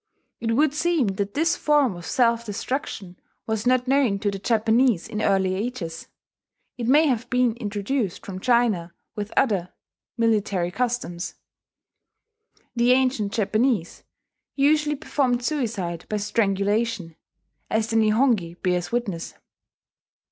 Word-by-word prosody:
It 230 Hz, -1 st, -1 dB
would 295 Hz, +2 st, +3 dB
seem 305 Hz, -, +1 dB
that 200 Hz, 0 st, -3 dB
this 330 Hz, +4 st, +2 dB
form 290 Hz, -, +2 dB
of 175 Hz, 0 st, -9 dB
self 235 Hz, -2 st, +2 dB
destruction 205 Hz, -4 st, -4 dB, 0.3 s
was 220 Hz, +1 st, -2 dB
not 255 Hz, 0 st, +2 dB
known 265 Hz, -6 st, +3 dB
to 205 Hz, 0 st, -1 dB
the 195 Hz, -, -5 dB
Japanese 225 Hz, -1 st, +2 dB
in 215 Hz, -1 st, -4 dB
early 190 Hz, -2 st, +2 dB
ages; 190 Hz, -6 st, -4 dB, 0.7 s
it 235 Hz, -2 st, -4 dB
may 295 Hz, +5 st, +5 dB
have 245 Hz, -4 st, 0 dB
been 250 Hz, -2 st, +2 dB
introduced 210 Hz, -1 st, -3 dB
from 185 Hz, -2 st, -6 dB
China, 215 Hz, -7 st, +1 dB, 0.2 s
with 210 Hz, 0 st, -5 dB
other 200 Hz, -9 st, +2 dB, 0.5 s
military 205 Hz, -6 st, +1 dB
customs. 230 Hz, -6 st, -3 dB, 1.4 s
The 240 Hz, +1 st, +4 dB
ancient 255 Hz, -6 st, +1 dB
Japanese 220 Hz, -2 st, 0 dB, 0.5 s
usually 295 Hz, +1 st, +2 dB
performed 260 Hz, -4 st, 0 dB
suicide 210 Hz, -, -2 dB
by 215 Hz, -, -1 dB
strangulation, 205 Hz, -2 st, 0 dB, 0.5 s
as 220 Hz, +1 st, 0 dB
the -, -, -1 dB
Nihongi 215 Hz, -5 st, +2 dB
bears 180 Hz, -1 st, 0 dB
witness. 210 Hz, -9 st, -3 dB
225 Hz, 125 wpm, -24 LUFS, 195-250 Hz, 1.4 s, may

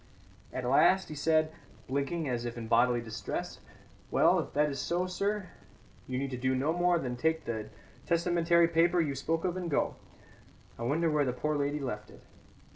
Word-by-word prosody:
At 130 Hz, -, -4 dB
last 185 Hz, +9 st, +4 dB
he -, -, -5 dB
said, 155 Hz, +1 st, +2 dB, 0.4 s
blinking 140 Hz, +4 st, -1 dB
as 120 Hz, -2 st, -1 dB
if 120 Hz, 0 st, -5 dB
in 115 Hz, -1 st, -5 dB
bodily 120 Hz, +1 st, +3 dB
distress: 110 Hz, -2 st, -5 dB, 0.5 s
"Well, -, -, +4 dB
if -, -, -4 dB
that 150 Hz, +1 st, +2 dB
is 135 Hz, -, -5 dB
so, 175 Hz, +1 st, 0 dB
sir, 200 Hz, +1 st, -2 dB, 0.6 s
you 125 Hz, -, -3 dB
need 135 Hz, -1 st, -2 dB
do 130 Hz, 0 st, +1 dB
no 140 Hz, +5 st, +1 dB
more 175 Hz, 0 st, +3 dB
than 125 Hz, -6 st, -3 dB
take 160 Hz, +5 st, 0 dB
the 110 Hz, -2 st, -4 dB, 0.4 s
testamentary 170 Hz, 0 st, +3 dB
paper 170 Hz, +2 st, +3 dB
you 150 Hz, -4 st, +1 dB
spoke 165 Hz, +5 st, -1 dB
of 180 Hz, -1 st, 0 dB
and 180 Hz, -2 st, -3 dB
go. 145 Hz, -, +1 dB, 0.9 s
I -, -, -6 dB
wonder 155 Hz, +7 st, +1 dB
where 150 Hz, -1 st, +2 dB
the 125 Hz, -3 st, -1 dB
poor 150 Hz, +5 st, -1 dB
lady 145 Hz, +1 st, -1 dB
left 110 Hz, -6 st, -5 dB
it." -, -, -16 dB
150 Hz, 185 wpm, -30 LUFS, 125-170 Hz, 0.9 s, last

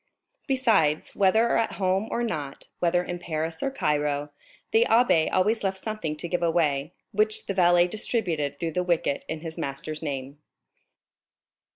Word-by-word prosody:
Besides, 220 Hz, -, +2 dB
whether 220 Hz, +4 st, +3 dB
at 230 Hz, -, 0 dB
home 190 Hz, +2 st, 0 dB
or 240 Hz, -, -1 dB
not, 150 Hz, -11 st, -4 dB
whether 175 Hz, 0 st, +2 dB
in 175 Hz, 0 st, -5 dB
Paris 160 Hz, -1 st, -3 dB
or -, -, 0 dB
Cairo, 150 Hz, -, -1 dB, 0.4 s
the 225 Hz, -, +5 dB
abbé 225 Hz, -9 st, +4 dB
always 210 Hz, +4 st, +2 dB
left 190 Hz, -1 st, -2 dB
something 215 Hz, -9 st, -3 dB
to 170 Hz, -, -6 dB
give 175 Hz, +1 st, -1 dB
away, 155 Hz, -3 st, +1 dB, 0.2 s
which 215 Hz, +1 st, 0 dB
the 195 Hz, -, -2 dB
valet 175 Hz, -1 st, +4 dB
distributed 170 Hz, -, -2 dB
through 165 Hz, -1 st, -2 dB
this 180 Hz, +2 st, -2 dB
wicket 165 Hz, -5 st, 0 dB
in 160 Hz, -1 st, -4 dB
his 160 Hz, -1 st, -7 dB
master's 140 Hz, +3 st, -5 dB
name. 140 Hz, -2 st, -5 dB
175 Hz, 155 wpm, -26 LUFS, 150-205 Hz, 0.4 s, the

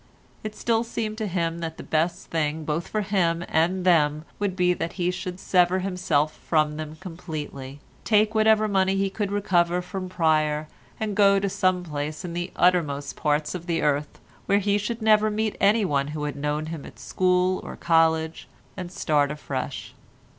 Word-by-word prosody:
It 215 Hz, 0 st, -5 dB
still 230 Hz, +1 st, +1 dB
seemed 220 Hz, -2 st, -4 dB
to 215 Hz, -, -1 dB
him 170 Hz, -2 st, -1 dB
that 160 Hz, -1 st, -5 dB
the -, -, -8 dB
best 165 Hz, +2 st, -1 dB
thing 155 Hz, -1 st, -1 dB
both 155 Hz, +3 st, -2 dB
for 215 Hz, -, -1 dB
him 175 Hz, -4 st, +1 dB
and 180 Hz, +3 st, +1 dB
them 155 Hz, -3 st, +3 dB
would 200 Hz, -3 st, -1 dB
be 180 Hz, -1 st, +3 dB
that 170 Hz, -1 st, -4 dB
he 180 Hz, -1 st, 0 dB
should 180 Hz, 0 st, -6 dB
sever 180 Hz, -1 st, +3 dB
himself 180 Hz, -5 st, 0 dB
from 155 Hz, -2 st, 0 dB
them 155 Hz, 0 st, -6 dB
completely, 155 Hz, -5 st, -7 dB, 0.2 s
take 215 Hz, 0 st, +3 dB
whatever 220 Hz, 0 st, +4 dB
money 190 Hz, -1 st, +2 dB
he 195 Hz, 0 st, 0 dB
could 200 Hz, 0 st, -2 dB
recover 180 Hz, -4 st, +2 dB
from 185 Hz, +1 st, -5 dB
Pryer, 155 Hz, -3 st, +1 dB, 0.3 s
and 215 Hz, -1 st, -2 dB
go 200 Hz, -1 st, +5 dB
to 200 Hz, -, -1 dB
some 185 Hz, -1 st, +1 dB
place 150 Hz, +1 st, -4 dB
in 170 Hz, -, -5 dB
the 175 Hz, +1 st, -3 dB
uttermost 150 Hz, -6 st, +1 dB
parts 150 Hz, 0 st, 0 dB
of 175 Hz, -1 st, -7 dB
the 165 Hz, -1 st, 0 dB
earth, 145 Hz, 0 st, 0 dB, 0.3 s
where 200 Hz, -, +4 dB
he 205 Hz, 0 st, +1 dB
should 220 Hz, +2 st, -4 dB
never 215 Hz, 0 st, +5 dB
meet 215 Hz, 0 st, -1 dB
anyone 195 Hz, -10 st, +3 dB
who 150 Hz, 0 st, -5 dB
had 145 Hz, -2 st, -3 dB
known 150 Hz, +2 st, -2 dB
him 155 Hz, -4 st, -7 dB
at -, -, -12 dB
school 185 Hz, 0 st, +1 dB
or -, -, -7 dB
college, 160 Hz, -1 st, +1 dB, 0.3 s
and 180 Hz, -2 st, -6 dB
start 150 Hz, -5 st, +1 dB
afresh. 140 Hz, -2 st, -5 dB
175 Hz, 180 wpm, -25 LUFS, 155-195 Hz, 0.3 s, go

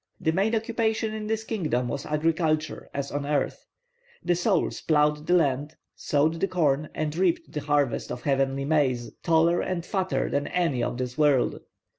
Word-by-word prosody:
The 165 Hz, -4 st, +1 dB
main 200 Hz, +7 st, +1 dB
occupation 220 Hz, -1 st, -1 dB
in 215 Hz, -1 st, -5 dB
this 220 Hz, 0 st, -1 dB
kingdom 155 Hz, -, -1 dB
was 140 Hz, +3 st, -4 dB
agriculture, 155 Hz, 0 st, 0 dB
as 140 Hz, 0 st, -4 dB
on 145 Hz, 0 st, -2 dB
earth; 145 Hz, -1 st, -2 dB, 0.6 s
the 175 Hz, -, +2 dB
souls 180 Hz, +1 st, 0 dB
ploughed 150 Hz, 0 st, +2 dB
the 180 Hz, -, +4 dB
land, 145 Hz, -2 st, +1 dB, 0.2 s
sowed 155 Hz, +3 st, +1 dB
the 195 Hz, -, +1 dB
corn, 155 Hz, -5 st, +1 dB
and 155 Hz, -1 st, -2 dB
reaped 330 Hz, -, 0 dB
the 150 Hz, -, -3 dB
harvest 145 Hz, -5 st, 0 dB
of 125 Hz, -, -6 dB
heavenly 135 Hz, 0 st, +1 dB
maize, 135 Hz, -6 st, +1 dB
taller 165 Hz, +1 st, +3 dB
and 180 Hz, -2 st, -3 dB
fatter 190 Hz, -1 st, -1 dB
than 140 Hz, 0 st, -1 dB
any 165 Hz, -9 st, 0 dB
of 120 Hz, -, -2 dB
this 125 Hz, +2 st, -4 dB
world. 145 Hz, -4 st, +3 dB
155 Hz, 170 wpm, -26 LUFS, 140-180 Hz, 0.6 s, the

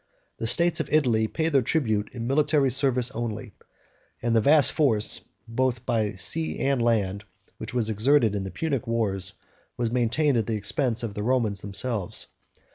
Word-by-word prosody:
The 115 Hz, -, -2 dB
states 170 Hz, +8 st, +2 dB
of -, -, -3 dB
Italy 120 Hz, -8 st, +2 dB
paid 160 Hz, +7 st, -1 dB
their 135 Hz, -, +5 dB
tribute 110 Hz, -6 st, 0 dB
in 120 Hz, -2 st, -6 dB
military 140 Hz, 0 st, +2 dB
service 130 Hz, -1 st, +1 dB
only, 110 Hz, -4 st, -5 dB, 0.7 s
and 120 Hz, -1 st, 0 dB
the 110 Hz, -, +4 dB
vast 145 Hz, +3 st, +5 dB
force, 115 Hz, -9 st, +2 dB, 0.3 s
both 125 Hz, +1 st, -1 dB
by 110 Hz, -5 st, 0 dB
sea 80 Hz, -3 st, -2 dB
and 135 Hz, -2 st, +1 dB
land, 105 Hz, -4 st, 0 dB, 0.4 s
which -, -, -6 dB
was 115 Hz, -3 st, +1 dB
exerted 115 Hz, +1 st, +3 dB
in 100 Hz, -2 st, -2 dB
the 95 Hz, -, -5 dB
Punic 135 Hz, -, -3 dB
wars, 100 Hz, -5 st, -1 dB, 0.4 s
was 120 Hz, -2 st, -1 dB
maintained 125 Hz, +3 st, +2 dB
at 110 Hz, -, -2 dB
the 115 Hz, -, -1 dB
expense 115 Hz, +3 st, 0 dB
of 110 Hz, -3 st, -4 dB
the 105 Hz, -, -5 dB
Romans 115 Hz, -4 st, 0 dB
themselves. 100 Hz, -1 st, -3 dB
115 Hz, 170 wpm, -25 LUFS, 105-130 Hz, 0.7 s, their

